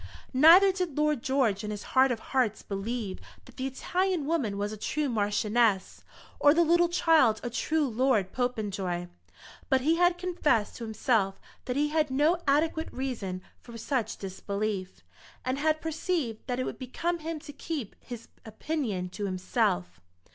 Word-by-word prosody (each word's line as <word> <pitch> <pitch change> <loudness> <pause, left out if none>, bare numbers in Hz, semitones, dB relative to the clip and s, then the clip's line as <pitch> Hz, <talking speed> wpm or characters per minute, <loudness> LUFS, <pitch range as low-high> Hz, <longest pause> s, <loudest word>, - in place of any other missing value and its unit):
Neither 335 +9 +8
did 360 -6 -3
Lord 300 -4 +1
George 235 -7 +1
in 210 - -4
his 210 -1 -5
heart 260 0 +5
of 235 - -2
hearts 245 -5 +1
believe 200 0 -4 0.3
that - - -16
the 260 - -2
Italian 355 +4 -1
woman 275 -11 -1
was 205 +1 -2
a - - -5
true 300 +7 -1
Marchioness 210 -2 +1 0.4
or 290 +1 +6
the 340 - +5
little 345 +1 +4
child 315 -10 +4
a 240 - -3
true 310 +5 0
Lord 230 -5 +1
Popenjoy; 200 -8 -2 0.6
but 265 -3 +3
he 320 +5 +2
had 350 0 +3
confessed 310 - 0
to 235 - -7
himself 220 -3 0 0.3
that 250 - -2
he 295 +1 +1
had 305 -1 +1
no 300 +6 +2
adequate 315 +3 +1
reason 220 -9 -4 0.2
for 235 -1 -11
such 230 -1 -2
disbelief, 195 - -4 0.4
and 255 +2 -1
had 310 +1 +1
perceived 320 - -2
that 250 -1 -2
it - - 0
would - - -5
become 335 +7 -2
him 325 +1 -4
to 295 -1 -10
keep 290 -8 -5
his 240 -2 -9 0.2
opinion 220 - -3
to 205 +3 -5
himself. 90 - -1
255 Hz, 160 wpm, -28 LUFS, 210-310 Hz, 0.6 s, Neither